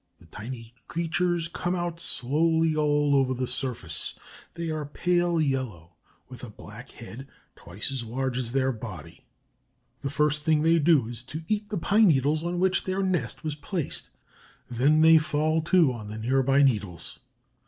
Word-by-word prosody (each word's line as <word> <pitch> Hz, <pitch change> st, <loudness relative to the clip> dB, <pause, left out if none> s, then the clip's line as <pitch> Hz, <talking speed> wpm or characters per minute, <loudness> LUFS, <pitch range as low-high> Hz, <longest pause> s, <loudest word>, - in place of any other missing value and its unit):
The -, -, -18 dB
tiny 115 Hz, +6 st, -8 dB
creatures 170 Hz, 0 st, 0 dB
come 175 Hz, +1 st, -2 dB
out 175 Hz, -1 st, -3 dB
slowly 160 Hz, +4 st, +1 dB
all 145 Hz, -1 st, +2 dB
over 130 Hz, -1 st, +2 dB
the 130 Hz, +1 st, -1 dB
surface. 115 Hz, -, -3 dB, 0.4 s
They 170 Hz, -1 st, -3 dB
are 155 Hz, -1 st, -2 dB
pale 175 Hz, +3 st, +1 dB
yellow, 130 Hz, -, -2 dB, 0.3 s
with 130 Hz, -1 st, -12 dB
a 120 Hz, -, -6 dB
black 110 Hz, +4 st, -12 dB
head 120 Hz, +3 st, -10 dB, 0.3 s
twice 100 Hz, +9 st, -5 dB
as 130 Hz, -3 st, -3 dB
large 130 Hz, +3 st, -2 dB
as 125 Hz, -2 st, -2 dB
their 135 Hz, 0 st, +1 dB
body. 105 Hz, -, -9 dB, 0.8 s
The 140 Hz, -, -2 dB
first 150 Hz, +1 st, +1 dB
thing 155 Hz, -1 st, +2 dB
they 165 Hz, +1 st, +4 dB
do 150 Hz, -6 st, +4 dB
is 120 Hz, -1 st, -6 dB
to 155 Hz, +5 st, -6 dB
eat 210 Hz, 0 st, -1 dB
the 210 Hz, -, -2 dB
pine 210 Hz, +5 st, +4 dB
needles 150 Hz, 0 st, +2 dB
on 175 Hz, +1 st, -2 dB
which 190 Hz, +1 st, +2 dB
their 190 Hz, +1 st, -1 dB
nest 185 Hz, -2 st, -1 dB
was 155 Hz, -1 st, -2 dB
placed; 150 Hz, +2 st, -4 dB, 0.6 s
then 135 Hz, +6 st, +3 dB
they 160 Hz, 0 st, +8 dB
fall 155 Hz, +1 st, 0 dB
to 170 Hz, -7 st, +4 dB
on 110 Hz, -3 st, -8 dB
the 105 Hz, +1 st, -6 dB
near 130 Hz, +5 st, +1 dB
by 135 Hz, +2 st, +4 dB
needles. 105 Hz, -, 0 dB
145 Hz, 170 wpm, -27 LUFS, 125-165 Hz, 0.8 s, they